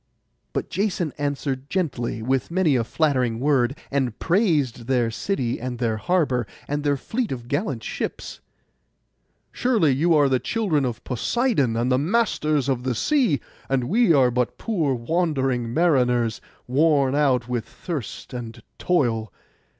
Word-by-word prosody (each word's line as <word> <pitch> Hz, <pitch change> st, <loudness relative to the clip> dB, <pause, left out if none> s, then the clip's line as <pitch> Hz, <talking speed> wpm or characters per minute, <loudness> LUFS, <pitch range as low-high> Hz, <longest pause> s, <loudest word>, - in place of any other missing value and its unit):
But -, -, -2 dB
Jason 185 Hz, -6 st, -1 dB
answered 140 Hz, -1 st, -2 dB
gently, 130 Hz, -, -2 dB
with 130 Hz, +2 st, 0 dB
many 170 Hz, -5 st, +2 dB
a 120 Hz, -, +2 dB
flattering 125 Hz, -4 st, 0 dB
word, 135 Hz, -1 st, +2 dB
and 135 Hz, -5 st, 0 dB
praised 155 Hz, -, +1 dB
their 125 Hz, -3 st, +1 dB
city 125 Hz, -, -2 dB
and 125 Hz, +1 st, -4 dB
their 115 Hz, -2 st, 0 dB
harbour, 135 Hz, -, +1 dB, 0.2 s
and 145 Hz, 0 st, -2 dB
their 145 Hz, -1 st, +1 dB
fleet 230 Hz, -, -3 dB
of 120 Hz, -3 st, -5 dB
gallant 135 Hz, -4 st, -2 dB
ships. -, -, -5 dB, 1.1 s
'Surely 225 Hz, -, +2 dB
you 160 Hz, +6 st, +3 dB
are 145 Hz, -2 st, +5 dB
the 130 Hz, -2 st, +2 dB
children 180 Hz, -, 0 dB
of 120 Hz, -3 st, -4 dB
Poseidon, 140 Hz, -, 0 dB
and 120 Hz, +3 st, 0 dB
the 130 Hz, -, +3 dB
masters 155 Hz, -, +1 dB
of 130 Hz, -3 st, 0 dB
the 125 Hz, -1 st, -1 dB
sea; 240 Hz, -, +2 dB, 0.3 s
and 135 Hz, -2 st, +1 dB
we 205 Hz, -, +3 dB
are 130 Hz, -5 st, +5 dB
but 125 Hz, 0 st, -1 dB
poor 165 Hz, -, 0 dB
wandering 130 Hz, -3 st, 0 dB
mariners, 125 Hz, -7 st, +2 dB, 0.2 s
worn 140 Hz, 0 st, +3 dB
out 135 Hz, -5 st, +2 dB
with 120 Hz, -2 st, -2 dB
thirst 145 Hz, -, -6 dB
and 115 Hz, -2 st, -7 dB, 0.2 s
toil. 115 Hz, -, +1 dB
135 Hz, 145 wpm, -23 LUFS, 125-165 Hz, 1.1 s, are